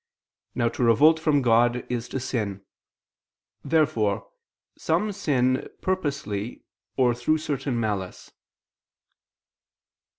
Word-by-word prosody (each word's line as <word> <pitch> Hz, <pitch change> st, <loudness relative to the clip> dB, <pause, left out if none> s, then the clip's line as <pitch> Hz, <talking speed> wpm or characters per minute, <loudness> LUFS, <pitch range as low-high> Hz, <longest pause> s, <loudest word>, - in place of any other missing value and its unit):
Now 120 Hz, -, +1 dB
to 120 Hz, -, -3 dB
revolt 145 Hz, +8 st, +5 dB
from 150 Hz, -4 st, +2 dB
God 120 Hz, +1 st, +3 dB
is 120 Hz, -1 st, -3 dB
to 135 Hz, -, -3 dB
sin. 105 Hz, -6 st, -3 dB, 1.0 s
Therefore 120 Hz, -11 st, +1 dB, 0.5 s
some 210 Hz, 0 st, 0 dB
sin 130 Hz, -10 st, 0 dB
purposely 140 Hz, -, -3 dB, 0.3 s
or 125 Hz, -2 st, +4 dB
through 120 Hz, +7 st, +1 dB
certain 135 Hz, -5 st, -2 dB
malice. 105 Hz, -5 st, -4 dB
125 Hz, 95 wpm, -25 LUFS, 115-150 Hz, 1.0 s, revolt